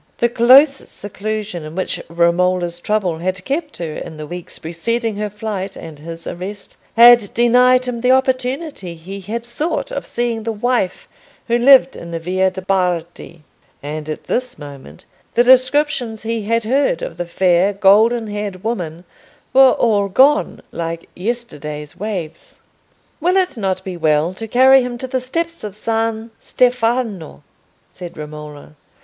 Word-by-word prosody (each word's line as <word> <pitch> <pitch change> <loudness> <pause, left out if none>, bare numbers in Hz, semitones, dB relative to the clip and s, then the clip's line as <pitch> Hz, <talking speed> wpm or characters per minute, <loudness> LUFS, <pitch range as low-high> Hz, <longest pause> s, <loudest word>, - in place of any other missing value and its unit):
The 235 - +2
close 265 +5 +6
seclusion 205 -3 -5
in 155 +1 -9
which 185 - -3
Romola's 175 +1 +1
trouble 185 -4 -1
had 185 +2 -3
kept 295 +2 -3
her 165 -3 -5
in 155 - -8
the 155 - -6
weeks 175 +3 -8
preceding 220 +7 -2
her 210 0 -2
flight 205 -2 -5
and 160 -3 -10
his 165 +2 -9
arrest, 195 +3 -7 0.2
had 235 -3 +7
denied 250 +2 +4
him 240 -2 -4
the 250 - +1
opportunity 260 - 0
he 190 +5 -9
had 230 +5 -5
sought 310 - -3
of - - -5
seeing 235 -1 -2
the 225 +1 -3
Wife 225 -3 -1 0.4
who 235 - +1
lived 265 +1 +6
in 170 - -9
the 170 - -4
Via 185 +3 0
de' 190 0 -8
Bardi: 175 -3 -2 0.4
and 150 +1 -5
at 155 - -5
this 255 0 -2
moment 140 - -12 0.3
the 240 - +5
descriptions 255 -3 +2
he 225 -2 -3
had 230 +1 +1
heard 255 -6 +1
of 165 - -6
the 175 - -3
fair 180 +2 +2
golden 215 +4 +4
haired 205 -3 -5
woman 175 -7 -4 0.5
were 265 -1 +7
all 205 -4 +1
gone, 275 +9 +3
like 165 0 -5
yesterday's 150 - -5
waves. 190 -7 -6 0.6
"Will 360 +4 +2
it 370 -5 +1
not 190 -4 -2
be 185 -1 -6
well 160 +1 +1
to 225 +4 -7
carry 260 +3 +6
him 245 -1 -4
to 260 - -5
the 260 0 -2
steps 335 +6 -4
of 210 -2 -6
San 225 +1 -2
Stefano?" 230 - 0 0.5
said 175 -2 -10
Romola. 150 -1 -9
210 Hz, 155 wpm, -18 LUFS, 175-245 Hz, 0.6 s, had